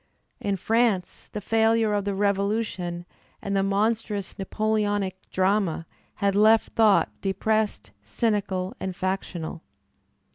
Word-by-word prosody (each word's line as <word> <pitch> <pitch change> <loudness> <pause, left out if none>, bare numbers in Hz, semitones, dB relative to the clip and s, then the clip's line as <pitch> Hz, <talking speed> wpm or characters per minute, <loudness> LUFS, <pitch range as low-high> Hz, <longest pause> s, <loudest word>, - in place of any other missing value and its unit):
In 200 -1 -1
France 220 -1 0
the 210 - -5
failure 225 0 +2
of 205 -1 0
the 200 -1 -1
Revolution 200 -3 -1 0.3
and 200 0 -3
the 195 - +3
monstrous 205 0 0
Napoleonic 205 -2 -1
drama 190 -3 +1 0.3
had 200 -1 +1
left 215 +2 +5
thought 215 -3 +4
de 195 -1 0
pressed, 215 +2 -1
cynical 195 -5 -1
and 190 -1 -4
factional. 180 -4 -3
200 Hz, 115 wpm, -25 LUFS, 190-215 Hz, 0.3 s, left